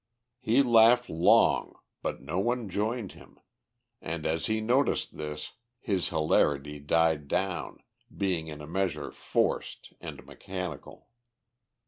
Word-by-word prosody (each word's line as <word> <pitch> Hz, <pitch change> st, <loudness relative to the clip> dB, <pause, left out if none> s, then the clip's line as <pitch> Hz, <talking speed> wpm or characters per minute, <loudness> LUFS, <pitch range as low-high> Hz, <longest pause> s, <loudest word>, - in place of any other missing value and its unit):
He 125 Hz, +2 st, +3 dB
laughed 120 Hz, 0 st, +5 dB
long, 80 Hz, +2 st, +4 dB, 0.3 s
but -, -, -4 dB
no 80 Hz, +6 st, -2 dB
one 120 Hz, 0 st, -1 dB
joined 105 Hz, +2 st, -2 dB
him, -, -, -17 dB, 0.6 s
and, 80 Hz, -2 st, -5 dB
as 80 Hz, 0 st, 0 dB
he 110 Hz, 0 st, 0 dB
noticed 125 Hz, +6 st, +1 dB
this, 75 Hz, 0 st, -6 dB, 0.3 s
his 100 Hz, -8 st, -1 dB
hilarity 75 Hz, -2 st, +1 dB
died 80 Hz, 0 st, +1 dB
down, 95 Hz, +3 st, -2 dB, 0.3 s
being 90 Hz, -5 st, -1 dB
in 75 Hz, -1 st, -8 dB
a 75 Hz, -, -9 dB
measure 80 Hz, -5 st, -2 dB
forced -, -, -2 dB
and -, -, -8 dB
mechanical. 90 Hz, -6 st, -7 dB
90 Hz, 120 wpm, -29 LUFS, 75-110 Hz, 0.6 s, laughed